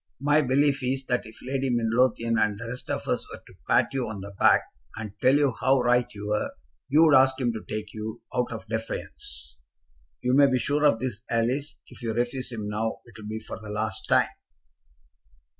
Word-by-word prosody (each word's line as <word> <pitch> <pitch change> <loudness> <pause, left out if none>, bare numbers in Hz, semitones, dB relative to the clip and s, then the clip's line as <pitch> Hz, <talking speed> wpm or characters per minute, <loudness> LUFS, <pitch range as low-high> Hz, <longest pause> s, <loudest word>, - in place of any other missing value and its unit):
My 145 +3 +4
belief 140 +1 +2
is 130 +1 -1
that 125 -2 0
if 110 - -13
Lady 135 +1 -1
Midlothian 115 0 +2
and 105 -1 +1
the 115 +2 -7
rest 125 +2 -7
of - - -3
us - - -1
were - - -9
to - - -16 0.2
pat - - +3
you 130 -4 -1
on 105 -3 -6
the 100 +1 -8
back, - - +5 0.3
and 110 -3 -6
tell 130 +2 +5
you 145 -3 +3
how 135 0 +4
right 125 0 +2
you 105 -2 -8
were, 105 0 0 0.4
you'd 155 +2 +6
ask 130 -1 +5
him 120 -3 +1
to 110 - -6
take 105 -1 -4
you, 110 +1 -5
out 125 -1 0
of 110 -1 -6
defiance. 110 - -5 0.7
You 125 0 +2
may 140 +1 +7
be 130 - +2
sure 145 +4 +1
of 140 -6 +4
this, 120 -4 -3
Alice; 130 +5 0
if - - -14
you 115 -2 -2
refuse 125 +2 -1
him 110 -3 -4
now, 110 +2 -2
it'll 110 -2 -11
be 110 +1 -4
for 110 - -8
the 105 - -9
last 110 +1 -3
time." - - +4
120 Hz, 205 wpm, -26 LUFS, 110-130 Hz, 0.7 s, may